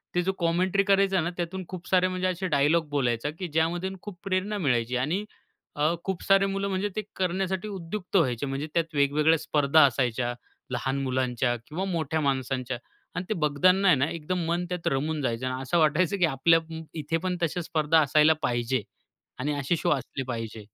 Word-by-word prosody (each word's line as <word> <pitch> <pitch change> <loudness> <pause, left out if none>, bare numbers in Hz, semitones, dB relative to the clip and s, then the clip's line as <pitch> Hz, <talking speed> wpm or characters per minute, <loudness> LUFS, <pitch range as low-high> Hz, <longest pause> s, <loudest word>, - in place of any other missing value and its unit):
ते 180 - +3
जो 190 - +1
कॉमेंट्री 180 +3 +2
करायचा 195 -2 +3
ना 170 - -1
त्यातून 180 +2 -3
खूप 180 -2 -8
सारे 185 0 +3
म्हणजे 185 0 -1
असे 185 +1 -2
डायलॉग 155 +1 +2
बोलायचा 130 -2 0
की 185 - -3
ज्यामधून 170 +4 -1
खूप 195 -4 -9
प्रेरणा 195 +2 -1
मिळायची 125 - 0
आणि 160 +11 -1 0.5
अ, 150 +3 +2
खूप 190 -2 -3
सारे 195 0 +4
मुलं 195 0 -1
म्हणजे 195 +2 -1
ते 215 - 0
करण्यासाठी 190 +2 -1
उद्युक्त 190 0 -6
व्हायचे. 130 -5 +1
म्हणजे 135 +3 -3
त्यात 165 -2 -1
वेगवेगळ्या 150 +3 +3
स्पर्धा 145 +1 +4
असायच्या. 120 -2 0 0.4
लहान 135 +2 -1
मुलांच्या 125 -2 0
किंवा 180 +6 -3
मोठ्या 160 -3 -1
माणसांच्या 130 -2 -1 0.4
आणि 180 - -3
ते - - +2
बघताना 180 +7 +3
आहे 170 - +7
ना 140 +4 +1
एकदम 170 +2 -3
मन 175 +1 0
त्यात 180 -1 -3
रमून 150 +3 -1
जायचं. 120 0 -1
अन 130 0 -3
असं 165 +6 +1
वाटायचं 160 +5 +2
की 180 - +4
आपल्या 165 +3 +4 0.4
इथे 165 +3 -1
पण 180 +1 -2
तशा 170 +2 0
स्पर्धा 160 -1 +2
असायला 150 +2 +5
पाहिजे 120 0 0 0.6
आणि 145 +3 -1
असे 140 +5 +1
शो - - 0
असले 135 -1 -2
पाहिजे. 115 -3 -5
160 Hz, 180 wpm, -27 LUFS, 135-185 Hz, 0.6 s, आहे